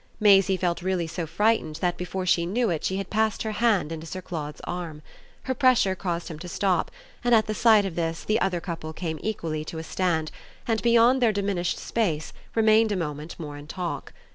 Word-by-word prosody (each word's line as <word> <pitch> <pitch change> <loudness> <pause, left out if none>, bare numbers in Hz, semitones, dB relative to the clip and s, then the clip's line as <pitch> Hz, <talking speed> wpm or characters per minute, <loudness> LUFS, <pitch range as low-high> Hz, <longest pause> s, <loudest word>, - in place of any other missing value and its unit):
Maisie 195 -2 +5
felt 175 -1 -1
really 185 -1 0
so 165 0 -4
frightened 210 -4 +1
that 175 +2 0
before 185 +1 -4
she 170 -1 +3
knew 225 +2 +1
it 160 - -2
she 190 - 0
had 195 -1 -5
passed 220 -1 +1
her 220 - -2
hand 210 -7 +2
into 165 0 -6
Sir 185 - -5
Claude's 155 -5 -6
arm. 165 -4 -5 0.4
Her 260 - -1
pressure 255 -7 +4
caused 175 -2 -3
him 155 -2 -7
to 180 - -8
stop, 185 0 0 0.3
and 240 -1 +5
at 220 - +4
the 215 - -2
sight 215 -2 +5
of 190 - -3
this 165 -1 -2
the 215 - +1
other 180 -2 +1
couple 165 -2 -5
came 160 -2 -4
equally 165 -8 -3
to 160 - -6
a 160 - -4
stand 160 -2 -1 0.4
and, 225 -2 +1
beyond 235 +2 +5
the 235 -3 +5
diminished 195 -4 -1
space, 170 -10 -1 0.2
remained 220 0 +4
a - - +1
moment 150 -2 -4
more 145 -3 -6
in 145 0 -11
talk. 175 +1 -4
185 Hz, 210 wpm, -26 LUFS, 165-215 Hz, 0.4 s, Maisie